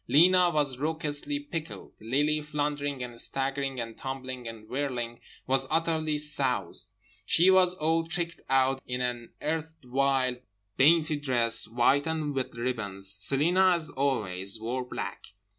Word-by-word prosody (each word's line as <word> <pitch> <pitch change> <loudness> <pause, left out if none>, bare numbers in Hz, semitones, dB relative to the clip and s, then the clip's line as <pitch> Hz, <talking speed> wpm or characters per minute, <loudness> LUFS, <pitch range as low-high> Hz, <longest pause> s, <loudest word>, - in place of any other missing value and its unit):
Lena 180 +4 +6
was 145 -6 0
raucously 155 - -1
pickled. 170 - -6
Lily, 145 +7 +1
floundering 145 -2 -2
and 120 -1 -6
staggering 135 -1 -1
and 115 -1 -5
tumbling 130 -2 -6
and 110 -1 -9
whirling 125 -3 -3 0.3
was 135 0 +2
utterly 160 -1 +1
soused. 145 -4 -1 0.3
She 180 +3 +5
was 185 -1 +5
all 165 0 +1
tricked 170 0 -3
out 135 0 +3
in 125 0 -2
an 120 -1 -3
erstwhile 135 -5 0 0.4
dainty 155 +2 +4
dress, 120 -6 +1
white, 125 +6 +2
and 155 -2 -1
with 130 -3 -3
ribbons. 100 -5 -2
Celina 175 - +4
(as 165 -2 -4
always) 110 -8 -1
wore 120 +3 -2
black. 105 -5 -6
140 Hz, 130 wpm, -28 LUFS, 125-155 Hz, 0.4 s, Lena